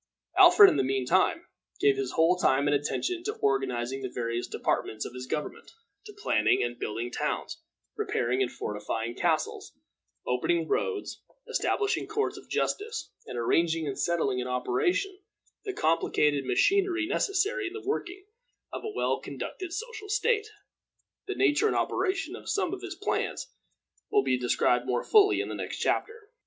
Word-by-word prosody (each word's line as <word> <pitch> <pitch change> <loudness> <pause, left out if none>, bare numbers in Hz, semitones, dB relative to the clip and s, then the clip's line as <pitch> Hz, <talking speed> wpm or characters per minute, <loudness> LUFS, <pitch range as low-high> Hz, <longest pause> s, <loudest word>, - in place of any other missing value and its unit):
Alfred, 415 -2 +9
in - - +2
the - - +2
mean 130 -1 0
time, - - +2 0.3
gave 140 -1 +4
his 135 -1 -3
whole 165 +3 +4
time 140 -5 +2
and 145 - +3
attention 340 - -1
to 425 +3 -2
organizing 135 -1 -1
the 130 - -4
various 120 -1 -3
departments 110 - -2
of - - -7
his 125 0 -7
government, 150 - -5 0.3
to 425 - -9
planning 420 +3 +2
and 120 0 -4
building 115 +3 -3
towns, - - -3 0.3
repairing 125 +2 0
and 125 - 0
fortifying 110 +3 -4
castles, - - -1 0.5
opening 160 +7 0
roads, 425 - -2 0.3
establishing 410 -1 0
courts 430 0 -1
of - - -12
justice, 445 +3 -2 0.2
and 125 - -6
arranging 165 +7 +1
and 140 -2 -4
setting 160 -7 0
in 125 - -3
operation 125 - 0 0.5
the 400 - -2
complicated 150 - +1
machinery 355 - +2
necessary 400 +4 0
in 345 - -7
the 420 -3 -8
working 380 -2 -3 0.5
of - - -5
a 440 - -3
well 415 - 0
conducted 370 -3 -6
social 440 +1 -6
state. 430 +1 +1 0.8
The 390 - -3
nature 395 +2 +3
and - - 0
operation 375 -2 -1
of - - -9
some 375 -3 0
of 385 - -5
his 380 -1 -6
plans 400 - -2 0.6
will 415 -1 +3
be - - +2
described 125 0 +2
more 125 - 0
fully 410 -2 +5
in - - -4
the - - -5
next - - -5
chapter. 445 -1 -2
170 Hz, 160 wpm, -28 LUFS, -, 0.8 s, Alfred